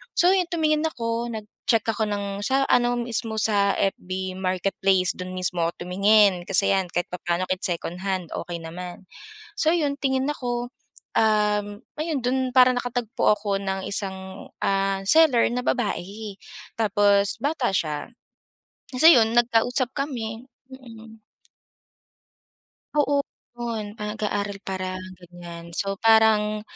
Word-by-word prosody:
So, 355 +1 +5
yun 365 -2 +1
tumingin 310 -2 +1
ako, 235 -5 -2
nag-check 220 +2 -2
ako 220 0 0
ng 200 -1 -3
sa 270 +3 +2
ano 245 0 +3
mismo, 230 -2 -3
sa 200 -2 +2
FB 190 -1 -2
marketplace. 185 0 +1
Do'n 185 0 -6
mismo 180 -1 -1
ako 170 +1 -4
tumingin, 195 0 +4
kasi 195 +2 +3
'yan 190 -1 0
kahit 175 - -1
papaano 175 0 -2
kahit 185 0 -1
secondhand 180 0 -3
okey 175 -1 -5
naman. 175 +3 -8 0.5
So 315 - +2
'yon, 295 -4 0
tingin 265 -1 +1
ako, 245 -4 -3 0.5
um, 210 -1 +2 0.3
ayun 310 -3 -1
do'n 260 +1 0
parang 255 -1 +6
nakatagpo 245 -3 0
ako 205 -1 -1
ng 190 -1 -3
isang, 190 -1 -5
ah, 195 0 +1
seller 295 -3 +5
na 250 - -1
babae 210 -2 -2 0.5
tapos 205 -2 +3
bata 285 -3 0
siya. 150 -4 -2 0.8
Tas 255 +5 +1
ayon, 230 -9 +7
nagkausap 240 +2 +2
kami, 235 -5 -4 0.3
mm. 225 -4 -13 1.7
Oo, 285 -1 +2 0.3
'yon. 225 -3 -5
Parang 210 0 -4
nag-aaral 205 -2 -3
parang 185 -1 -4 0.2
ganiyan, 170 -1 -11
so 195 +3 -2
parang 220 -1 +4
210 Hz, 130 wpm, -24 LUFS, 190-245 Hz, 1.7 s, ayon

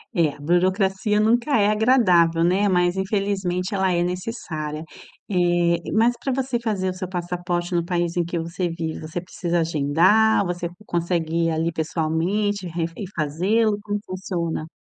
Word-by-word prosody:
É, 155 -4 +1
burocracia 190 +5 +1
nunca 235 +5 +3
é 205 - +4
agradável, 185 -8 +4
né, 195 +4 +3
mas 180 0 +2
infelizmente 190 -1 -1
ela 190 -1 +1
é 175 0 +1
necessária 175 -5 -4 0.4
eh, 175 -2 +2
mas 230 +3 +3
pra 270 - 0
você 260 -2 -1
fazer 205 -5 -1
o - - -6
seu 185 0 -6
passaporte 175 0 -3
no 170 -1 +1
país 175 -1 -1
em 175 - +2
que 170 +1 -4
você 170 +2 -2
vive, 165 -1 -4
você 160 +2 -4
precisa 175 -1 -2
agendar? 170 +8 +3
Você 175 -1 -3 0.2
consegue 170 -1 -1
ir, - - +1
aí, 165 +1 0
pessoalmente 175 +5 -1
re 165 0 -2
e 205 - -5
fazê-lo, 190 +9 +1
como 205 0 -3
funciona? 175 -4 -3
180 Hz, 155 wpm, -23 LUFS, 170-205 Hz, 0.4 s, é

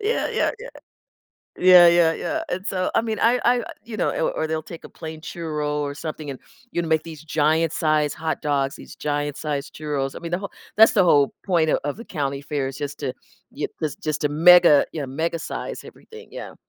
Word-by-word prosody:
Yeah, 435 +3 0
yeah, - - +1
yeah. 485 +3 -9 0.9
Yeah, 180 -1 +8
yeah, 170 -1 +4
yeah, 320 +1 -3
and 185 -3 -4
so, 185 -4 -1
I - - +3
mean, 220 -1 -3
I 240 +2 +4
I 245 -1 +3 0.2
you 230 -2 -7
know - - +1
or - - 0
or 160 - -2
they'll 160 0 -2
take 165 - -10
a - - -9
plain 160 -1 -9
churro 150 -2 -3
or 145 0 -4
something 155 -1 -6
and, 135 - -8 0.3
you - - 0
know, 170 - -3
make 160 -1 +2
these 160 -3 -10
giant-sized 155 -1 +1
hot 160 0 -3
dogs, 140 -2 0
these - - -12
giant-sized 145 -1 -3
churros, 145 -3 -3
I - - -7
mean, 170 - -6
the 175 - +1
whole 200 -1 -6 0.3
that's 220 - +8
the 195 - +5
whole 145 -5 +4
point 170 -5 +2
of - - +2
of 145 - -2
the 230 - -8
county 140 -2 -3
fair 145 -1 -3
is 135 0 -6
just 145 -1 -5
to 135 -3 -2 0.4
y - - -3 0.2
is 155 -2 -1
just 155 0 -3
to 150 - +2
mega, 170 0 +7
you 160 - -4
know, - - -4
mega 160 +6 -2
size 155 - -6
everything, 450 0 -13
yeah. - - -8
160 Hz, 220 wpm, -23 LUFS, 145-180 Hz, 0.9 s, Yeah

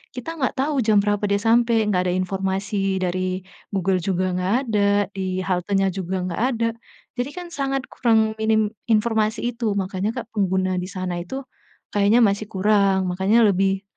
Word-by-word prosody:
kita 250 +5 -6
nggak 260 - 0
tahu 275 0 +1
jam 215 -2 +3
berapa 205 0 0
dia 200 - +3
sampai, 230 0 +3
nggak 185 -3 +2
ada - - 0
informasi 195 +1 -1
dari 185 0 -2 0.2
Google 190 -2 0
juga 185 0 -1
nggak 185 +3 0 0.2
ada, 200 -2 +2 0.2
di 185 -1 -3
haltenya 195 +1 +1
juga 190 -1 -3
nggak 180 +4 -3
ada, 230 -2 0 0.5
jadi 250 +3 -1
kan 355 -1 -6
sangat 270 -1 -2
kurang, 220 -2 +2
minim 220 -1 +2 0.2
informasi 220 0 +2
itu, 225 -4 -1
makanya, 190 +1 -1
Kak, - - -22
pengguna 190 -2 +1
di 180 - -5
sana 180 -2 -4
itu 265 +10 -6 0.5
kayaknya 205 +3 +4
masih 205 +1 0
kurang, 195 -1 +2
makanya 205 +5 +3
lebih 195 0 +2
200 Hz, 165 wpm, -22 LUFS, 185-220 Hz, 0.5 s, kayaknya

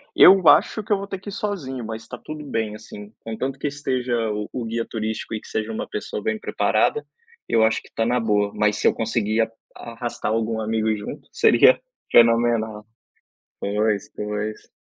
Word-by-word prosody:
Eu 185 -2 +8
acho 215 - +5
que 210 - -10
eu - - +3
vou 200 0 -6
ter 195 -1 -5
que 200 - -8
ir - - -6
sozinho, 150 - -4
mas 110 0 -5
está 125 - -9
tudo 155 +3 -8
bem 110 -5 -2
assim, 105 -1 -11
contanto 130 +4 -4
que 145 - -1
esteja 130 -4 -2 0.2
o 105 0 -4
o 125 - -3
guia 115 +1 -2
turístico 110 0 -4
e 110 - -5
que - - -14
seja 110 +1 -3
uma 110 - -4
pessoa 105 - -5
bem 110 0 -1
preparada, 450 - +1 0.4
eu 115 - +3
acho 110 0 +2
que - - -18
está 115 - -1
na 125 +2 +2
boa, 105 -3 +1
mas 105 0 +2
se - - +2
eu - - +4
conseguir 110 0 0 0.3
arrastar 120 -1 -4
algum 110 0 0
amigo 110 0 0
junto, 105 - -8
seria - - +5 0.3
fenomenal. 115 -2 +4 0.8
Pois, 105 0 0
pois. 105 +1 -4
115 Hz, 185 wpm, -23 LUFS, 110-125 Hz, 0.8 s, Eu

